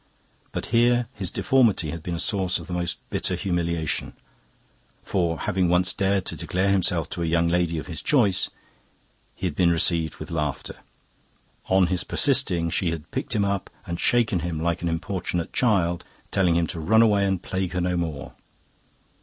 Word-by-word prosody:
But -, -, -4 dB
here 120 Hz, +1 st, +4 dB
his 95 Hz, -6 st, -1 dB
deformity 115 Hz, -, +2 dB
had 85 Hz, -, -6 dB
been 85 Hz, +2 st, -4 dB
a -, -, -4 dB
source 95 Hz, -3 st, +1 dB
of -, -, -8 dB
the 90 Hz, -, -7 dB
most 85 Hz, -1 st, -2 dB
bitter 90 Hz, -, -1 dB
humiliation, 85 Hz, -5 st, -1 dB, 0.9 s
for, 85 Hz, -3 st, -1 dB
having 90 Hz, -2 st, +1 dB
once 90 Hz, +2 st, +3 dB
dared 95 Hz, -1 st, 0 dB
to -, -, -1 dB
declare 95 Hz, +2 st, -1 dB
himself 90 Hz, -3 st, +1 dB
to 85 Hz, -, -4 dB
a -, -, 0 dB
young 85 Hz, +1 st, +2 dB
lady 85 Hz, -1 st, +1 dB
of 80 Hz, -, -4 dB
his 85 Hz, -3 st, -6 dB
choice, 120 Hz, -, +2 dB, 0.9 s
he -, -, -5 dB
had 85 Hz, -5 st, -2 dB
been 90 Hz, 0 st, +3 dB
received 85 Hz, -2 st, +2 dB
with -, -, -9 dB
laughter. 75 Hz, -5 st, -3 dB, 0.9 s
On 95 Hz, 0 st, +4 dB
his 90 Hz, 0 st, 0 dB
persisting, 85 Hz, -1 st, +1 dB
she 90 Hz, -, 0 dB
had 80 Hz, -1 st, -6 dB
picked -, -, -3 dB
him 100 Hz, -2 st, +2 dB
up 100 Hz, -1 st, -2 dB, 0.2 s
and 85 Hz, -3 st, -4 dB
shaken 115 Hz, -6 st, +2 dB
him 85 Hz, -1 st, -3 dB
like 85 Hz, +1 st, -1 dB
an 85 Hz, -, -1 dB
importunate 90 Hz, 0 st, -3 dB
child, 90 Hz, -8 st, +1 dB, 0.3 s
telling 90 Hz, -3 st, +2 dB
him 85 Hz, 0 st, +2 dB
to 80 Hz, -, -6 dB
run 110 Hz, +8 st, +4 dB
away 105 Hz, -3 st, +3 dB
and 95 Hz, -2 st, +1 dB
plague 95 Hz, -1 st, -3 dB
her 90 Hz, -, -1 dB
no 90 Hz, 0 st, 0 dB
more. 80 Hz, -5 st, -4 dB
90 Hz, 180 wpm, -24 LUFS, 85-95 Hz, 0.9 s, here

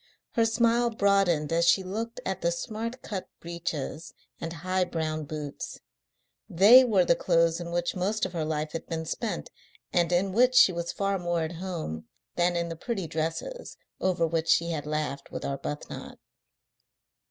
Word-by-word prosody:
Her 230 Hz, -2 st, +2 dB
smile 235 Hz, +1 st, +3 dB
broadened 195 Hz, -8 st, +2 dB
as 170 Hz, +1 st, +3 dB
she 190 Hz, -, +5 dB
looked 225 Hz, +5 st, -4 dB
at 190 Hz, -1 st, -2 dB
the 170 Hz, -, +2 dB
smart 230 Hz, +7 st, -4 dB
cut 195 Hz, -4 st, -5 dB
breeches 170 Hz, -2 st, -5 dB, 0.2 s
and 165 Hz, -, -4 dB
high 185 Hz, +3 st, 0 dB
brown 155 Hz, -3 st, -2 dB
boots. 150 Hz, -1 st, -6 dB, 0.7 s
They 215 Hz, +9 st, +8 dB
were 205 Hz, -7 st, +3 dB
the 170 Hz, -, +4 dB
clothes 165 Hz, -1 st, +2 dB
in 170 Hz, -1 st, -5 dB
which 175 Hz, +2 st, -1 dB
most 200 Hz, +4 st, 0 dB
of 185 Hz, -, -6 dB
her 165 Hz, -2 st, -1 dB
life 155 Hz, 0 st, -2 dB
had 165 Hz, -, -6 dB
been 160 Hz, -1 st, -3 dB
spent, 205 Hz, +2 st, -3 dB, 0.4 s
and 175 Hz, 0 st, +2 dB
in 185 Hz, +2 st, +2 dB
which 250 Hz, +5 st, +4 dB
she 195 Hz, -, +8 dB
was 170 Hz, 0 st, -3 dB
far 195 Hz, -1 st, -1 dB
more 175 Hz, -1 st, 0 dB
at 160 Hz, +1 st, -5 dB
home 165 Hz, -, -5 dB, 0.3 s
than 175 Hz, 0 st, +2 dB
in 170 Hz, 0 st, 0 dB
the 165 Hz, -, -4 dB
pretty 195 Hz, +1 st, -3 dB
dresses 165 Hz, -, -4 dB, 0.2 s
over 180 Hz, -3 st, +1 dB
which 165 Hz, 0 st, -1 dB
she 170 Hz, 0 st, +3 dB
had 150 Hz, -2 st, -3 dB
laughed 150 Hz, -2 st, -3 dB
with -, -, -5 dB
Arbuthnot. 140 Hz, +1 st, -5 dB
175 Hz, 170 wpm, -28 LUFS, 160-200 Hz, 0.7 s, They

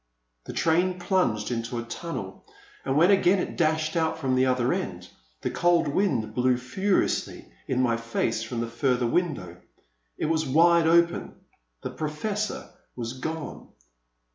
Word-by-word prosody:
'*— -, -, -49 dB
The -, -, -7 dB
train 180 Hz, +3 st, +2 dB
plunged 150 Hz, -, 0 dB
into 115 Hz, 0 st, -3 dB
a 115 Hz, -, -2 dB
tunnel, 115 Hz, -, -6 dB, 0.4 s
and 135 Hz, +1 st, 0 dB
when 175 Hz, +5 st, +6 dB
again 195 Hz, -1 st, +4 dB
it -, -, -3 dB
dashed 160 Hz, 0 st, +1 dB
out 160 Hz, -1 st, +1 dB
from 135 Hz, -5 st, -1 dB
the 130 Hz, 0 st, +3 dB
other 125 Hz, -1 st, +2 dB
end, -, -, -4 dB, 0.3 s
the -, -, -2 dB
cold 175 Hz, -2 st, +3 dB
wind 135 Hz, -, 0 dB
blew 125 Hz, +1 st, +2 dB
furiously 190 Hz, -, -1 dB
in -, -, 0 dB
my 115 Hz, -2 st, +2 dB
face 115 Hz, -1 st, -1 dB
from 115 Hz, +1 st, -4 dB
the 115 Hz, -, -2 dB
further 125 Hz, +1 st, 0 dB
window. 115 Hz, -, -1 dB, 0.6 s
It -, -, -2 dB
was 160 Hz, 0 st, +1 dB
wide 165 Hz, +3 st, +4 dB
open; 170 Hz, +1 st, +2 dB, 0.5 s
the -, -, -4 dB
Professor 200 Hz, +8 st, -3 dB, 0.2 s
was 120 Hz, -1 st, -4 dB
gone. 160 Hz, +1 st, -6 dB
150 Hz, 155 wpm, -26 LUFS, 120-170 Hz, 0.6 s, when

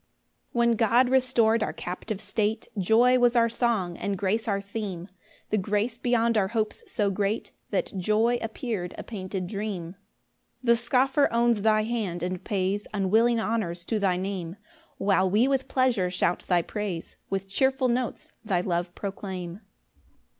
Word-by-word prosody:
1 235 Hz, 0 st, +3 dB
When 230 Hz, -, +2 dB
God 240 Hz, +3 st, +4 dB
restor'd 245 Hz, -4 st, +3 dB
our -, -, -1 dB
captive 190 Hz, +3 st, -5 dB
state, 215 Hz, +1 st, -1 dB
Joy 230 Hz, +6 st, +4 dB
was 245 Hz, 0 st, +4 dB
our 230 Hz, -1 st, +4 dB
song, 225 Hz, -7 st, 0 dB
and 200 Hz, -1 st, -2 dB
grace 210 Hz, +4 st, 0 dB
our 200 Hz, -2 st, +1 dB
theme; 200 Hz, -3 st, -5 dB, 0.4 s
The 215 Hz, -, +2 dB
grace 210 Hz, +4 st, -1 dB
beyond 235 Hz, -2 st, +2 dB
our 190 Hz, -, +1 dB
hopes 215 Hz, +1 st, -2 dB
so 205 Hz, -2 st, +1 dB
great, 200 Hz, +2 st, -1 dB, 0.2 s
That -, -, -1 dB
joy 215 Hz, +6 st, +2 dB
appear'd 220 Hz, -5 st, -4 dB
a -, -, -6 dB
painted 190 Hz, -3 st, -5 dB
dream. 195 Hz, -3 st, -4 dB, 0.7 s
2 -, -, -14 dB
The 235 Hz, 0 st, +6 dB
scoffer 265 Hz, +4 st, +2 dB
owns 235 Hz, -2 st, +2 dB
thy 215 Hz, 0 st, +3 dB
hand, 210 Hz, -7 st, -2 dB
and 180 Hz, 0 st, -3 dB
pays 200 Hz, +1 st, -1 dB
Unwilling 220 Hz, +4 st, +3 dB
honours 180 Hz, -7 st, -2 dB
to 220 Hz, +1 st, -1 dB
thy 190 Hz, -3 st, +2 dB
Name; 185 Hz, -2 st, -4 dB, 0.4 s
While 190 Hz, -1 st, +2 dB
we 215 Hz, +7 st, +3 dB
with 270 Hz, -1 st, 0 dB
pleasure 245 Hz, -8 st, +2 dB
shout 180 Hz, -1 st, 0 dB
thy 175 Hz, -2 st, +3 dB
praise, 200 Hz, -5 st, -5 dB
With 195 Hz, 0 st, -2 dB
cheerful 265 Hz, +6 st, +1 dB
notes 245 Hz, 0 st, -2 dB
thy 190 Hz, -5 st, +1 dB
love 175 Hz, -1 st, -2 dB
proclaim. 190 Hz, -2 st, -6 dB
210 Hz, 160 wpm, -27 LUFS, 190-235 Hz, 0.7 s, The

